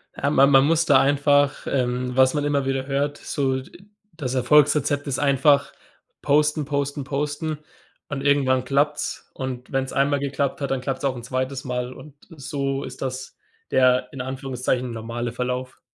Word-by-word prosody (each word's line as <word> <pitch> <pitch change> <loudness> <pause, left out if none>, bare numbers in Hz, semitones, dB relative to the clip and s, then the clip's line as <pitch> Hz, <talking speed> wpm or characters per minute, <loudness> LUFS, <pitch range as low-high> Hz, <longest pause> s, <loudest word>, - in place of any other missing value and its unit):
Ähm, 145 +2 -1
ma 135 - +7
man 135 -1 +5
muss 165 +2 +2
da 140 -4 +5
einfach, 145 0 +2
ähm 125 -1 -1
was 130 0 +5
man 145 - 0
immer 140 -2 +1
wieder 135 0 -1
hört, 140 +1 -1
so, 135 -2 -1
d - - -15
äh, 195 - -19 0.3
das 135 -5 -3
Erfolgsrezept 145 +2 +3
ist 135 -2 -1
einfach 140 0 +3 0.5
posten, 150 +1 +2
posten, 140 0 -2
posten 150 +3 -3 0.5
und 145 -2 -4
irgendwann 135 -2 +2
klappt's. 145 +3 -1
Und 130 -2 -6
wenn's 135 -1 -1
einmal 140 +1 +1
geklappt 140 0 -2
hat, 140 - -2
dann 135 -1 -1
klappt's 135 +1 -4
auch 135 -2 0
'n 120 - -8
2. 130 +2 -3
Mal 125 -2 -3
und 150 +1 -13 0.2
so 140 -3 -3
ist 130 0 -9
das 130 0 -5 0.4
der 130 -1 +3
in 135 - -5
Anführungszeichen 130 -1 -2
normale 115 +1 -4
Verlauf. 125 +1 -4
135 Hz, 170 wpm, -23 LUFS, 130-145 Hz, 0.5 s, ma